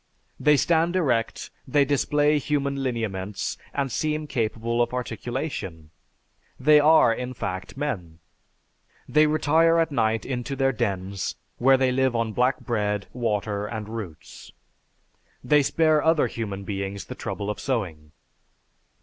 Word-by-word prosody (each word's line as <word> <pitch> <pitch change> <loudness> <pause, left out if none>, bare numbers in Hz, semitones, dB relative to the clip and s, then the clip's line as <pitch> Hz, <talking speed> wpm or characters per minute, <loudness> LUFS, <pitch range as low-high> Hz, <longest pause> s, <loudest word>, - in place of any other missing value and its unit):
They 150 -1 +4
stand 165 +5 +2
erect, 125 -11 0 0.2
they 140 +2 +3
display 145 +2 +2
human 140 -1 -1
lineaments, 105 -6 -3 0.2
and 140 -2 -2
seem 155 +3 -1
capable 115 -3 -1
of 120 +1 0
articulation. 120 - -5 0.7
They 150 +3 +6
are, 150 -5 +6
in 125 +2 -5
fact, 95 +2 -5
men. 100 - -4 0.9
They 150 +1 +4
retire 160 +2 +3
at 165 -1 +2
night 110 -4 +1
into 130 +1 -3
their 135 0 +2
dens, 100 -5 -2 0.2
where 135 +2 +5
they 130 -1 +2
live 130 -1 +1
on 115 -1 -1
black 125 +3 +1
bread, 105 -4 -1
water 105 -3 -1
and 110 -2 -5
roots. 105 -9 -8 0.9
They 150 -1 +4
spare 155 +1 +2
other 160 -3 +4
human 105 -4 -4
beings 100 0 -4
the - - -7
trouble 100 +1 -4
of - - -7
sowing." 85 - -3
125 Hz, 130 wpm, -25 LUFS, 105-145 Hz, 0.9 s, They